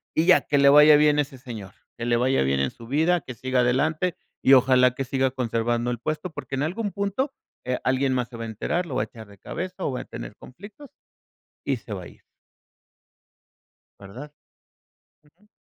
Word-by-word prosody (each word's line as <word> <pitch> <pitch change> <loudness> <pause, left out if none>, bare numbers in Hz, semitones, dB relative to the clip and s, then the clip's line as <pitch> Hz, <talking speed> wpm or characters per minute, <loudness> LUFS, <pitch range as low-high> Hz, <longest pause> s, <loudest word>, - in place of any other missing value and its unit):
y 160 - +2
ya, 180 - +6
que 145 - 0
le 140 0 +6
vaya 150 +1 +8
bien 150 0 +4
ese 140 -3 -2
señor, 110 -7 -9 0.2
que 120 - -4
le 120 0 +2
vaya 130 - +2
bien 70 0 0
en 70 -1 +1
su 115 - -14
vida, 160 +6 +2
que 130 - -8
siga 130 +2 0
adelante 155 +8 +1 0.3
y 135 - +6
ojalá 125 -1 +5
que 135 +1 -4
siga 130 +1 0
conservando 120 -1 -1
el 120 - -2
puesto 155 +8 -3
porque 155 - -9
en 135 - -2
algún 200 +7 -2
punto, 200 +8 -2 0.3
eh, 125 0 -1
alguien 130 +1 +1
más 125 -2 -1
se 120 - -10
va 115 - -5
a - - -5
enterar, 165 - -2
lo 155 - -7
va - - +1
a - - -4
echar 110 -1 -13
de 100 -1 -17
cabeza 185 - -6
o - - -1
va 125 - -4
a - - -11
tener - - -9
conflictos 205 - -13 0.7
y 135 -2 0
se 115 - -9
va 95 -3 -6
a - - -9
ir. - - -22 1.7
¿Verdad? 120 +10 -10 0.9
Ujú. 170 +8 -29
130 Hz, 205 wpm, -24 LUFS, 120-155 Hz, 1.7 s, vaya